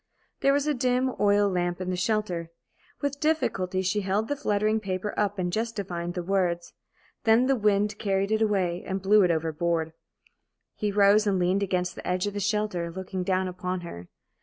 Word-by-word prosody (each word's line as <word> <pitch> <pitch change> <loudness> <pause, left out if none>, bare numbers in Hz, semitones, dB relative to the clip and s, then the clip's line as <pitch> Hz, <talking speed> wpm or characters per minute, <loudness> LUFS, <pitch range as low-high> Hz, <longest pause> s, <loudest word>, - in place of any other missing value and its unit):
There 275 - +3
was 285 +1 +1
a 300 - +1
dim 255 0 +1
oil 205 0 +4
lamp 175 -2 -1
in 185 0 -3
the - - -1
shelter. 180 -3 -1 0.5
With 285 -1 -2
difficulty 190 - 0
she 200 +3 0
held 200 +3 -1
the 290 - 0
fluttering 215 -5 +1
paper 195 0 -3
up 205 0 0
and 175 -1 -2
just 230 +1 -1
divined 175 -4 -4
the 180 - -2
words. 175 -2 -1 0.5
Then 225 +3 +5
the 270 +1 +3
wind 210 -2 +1
carried 195 -1 0
it 220 0 +2
away 190 -5 +1
and 190 +1 -3
blew 205 +2 +5
it 180 - +4
overboard. 165 0 0 0.8
He 210 -1 -2
rose 205 +1 +4
and 195 -2 +2
leaned 185 +2 +1
against 180 -2 -1
the - - -9
edge 180 +1 0
of 205 - -3
the 205 - -3
shelter, 200 -4 -1
looking 190 +1 -5
down 185 0 0
upon 180 0 -4
her. 90 - -9
195 Hz, 190 wpm, -27 LUFS, 180-215 Hz, 0.8 s, Then